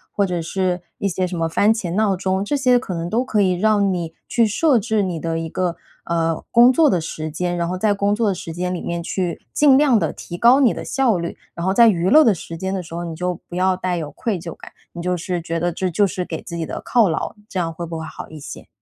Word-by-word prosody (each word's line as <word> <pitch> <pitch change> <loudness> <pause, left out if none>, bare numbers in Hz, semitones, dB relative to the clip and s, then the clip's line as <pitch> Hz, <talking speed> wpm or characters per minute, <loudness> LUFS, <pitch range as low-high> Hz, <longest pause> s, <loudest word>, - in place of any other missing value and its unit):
或 200 - +2
者 180 -1 -2
是 180 +1 -1 0.2
一 200 - 0
些 185 0 -1
什 180 - -5
么 165 - 0
番 205 +6 +3
茄 195 -7 -4
闹 210 -2 +2
钟。 190 +1 -1
这 290 - -1
些 255 -2 +4
可 195 - -6
能 170 0 -3
都 230 +5 +1
可 215 -5 +1
以 185 -2 +3
让 200 +1 +2
你 170 -2 -4
去 235 - +3
设 260 +6 +3
置 220 0 0
你 180 -4 -3
的 165 0 -2
一 165 0 -4
个 180 -1 -1 0.3
呃， 165 -1 -1
工 240 +2 +7
作 305 +4 +4
的 180 - +2
时 155 -1 -5
间， 175 +3 -2
然 170 0 -1
后 180 +1 -3
在 205 +2 +2
工 200 +1 +1
作 220 -1 +1
的 195 - 0
时 165 -2 -7
间 180 +2 -2
里 180 - -4
面 170 0 -3
去 175 0 -3
尽 290 -3 +5
量 275 -5 +4
地 165 - -1
提 175 - -8
高 245 +6 +6
你 260 -5 +5
的 - - -6
效 255 -7 +1
率。 170 0 -4 0.2
然 170 - -4
后 190 - +2
在 230 +3 +7
娱 180 -3 +2
乐 310 +8 +7
的 225 - +4
时 165 0 -8
间 190 +3 -3
的 190 -2 -3
时 165 - -12
候， 170 +1 -4
你 165 -1 -5
就 180 +1 -3
不 175 - -7
要 185 +1 +2
带 180 -1 -2
有 155 -3 -5
愧 215 -6 -3
疚 165 0 -7
感， - - -13 0.2
你 170 - -6
就 180 +1 0
是 175 +1 -3
觉 165 0 -3
得 175 +1 0
这 185 +2 -1
就 190 +4 +2
是 180 0 -3
给 160 -2 -5
自 170 - -7
己 165 - -2
的 - - -6
犒 230 -6 +3
劳。 160 - -3
这 190 - -3
样 165 -2 -2
会 170 +1 -5
不 165 -1 -5
会 160 - -5
好 - - -9
一 155 - -10
些？ 145 - -9
180 Hz, 305 characters per minute, -21 LUFS, 170-210 Hz, 0.3 s, 工